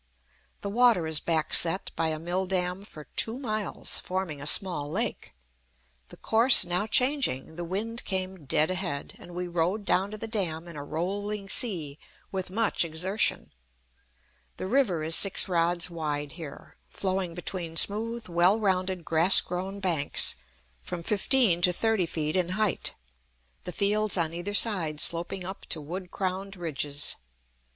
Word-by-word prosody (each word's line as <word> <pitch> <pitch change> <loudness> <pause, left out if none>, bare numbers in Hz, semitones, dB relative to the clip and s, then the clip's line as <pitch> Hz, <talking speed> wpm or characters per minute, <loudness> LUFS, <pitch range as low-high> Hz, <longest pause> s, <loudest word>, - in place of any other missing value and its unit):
The 200 - -4
water 235 -6 +4
is 160 -1 +1
backset 165 +3 +2
by 165 - 0
a 155 -1 -2
mill 175 +4 -2
dam 180 0 -2
for 155 -6 -11
two 225 +2 +1
miles, 215 -7 -1
forming 180 -6 -4
a 145 - -4
small 165 -4 +2
lake. - - -3 0.8
The - - -13
course 230 -2 +5
now 180 +4 0
changing, 250 - +2
the 175 - -5
wind 215 +7 -3
came 185 -4 -3
dead 155 +5 +2
ahead, 175 -6 -4
and 175 - -12
we 180 0 -3
rowed 175 +5 -1
down 190 +2 +1
to 215 - -7
the 225 - -5
dam 175 -7 -1
in 170 - -10
a 145 - -6
rolling 195 +6 -4
sea, 165 - +3 0.3
with 190 -2 -4
much 220 +1 0
exertion. 180 +6 +1 1.1
The - - -5
river 195 - +1
is 160 +1 +2
six 195 - +3
rods 175 0 +1
wide 150 -3 -3
here, 160 -4 -10
flowing 185 -3 -2
between 175 -2 -4
smooth, 225 +5 +1
well 175 +4 +3
rounded, 185 -3 -1
grass 165 +4 +6
grown 190 +3 -4
banks, 170 -7 +1 0.5
from 170 - -6
fifteen 210 -2 +2
to 180 0 +4
thirty 215 -1 0
feet 155 0 -3
in 180 -2 0
height, 215 -4 +1 0.7
the - - -4
fields 210 +1 +1
on 165 -2 +1
either 175 +4 -3
side 175 -10 +2
sloping 175 +4 -1
up 190 +2 -8
to 160 - 0
wood 180 +5 -7
crowned 190 +2 -4
ridges. 150 -4 0
180 Hz, 155 wpm, -27 LUFS, 165-200 Hz, 1.1 s, grass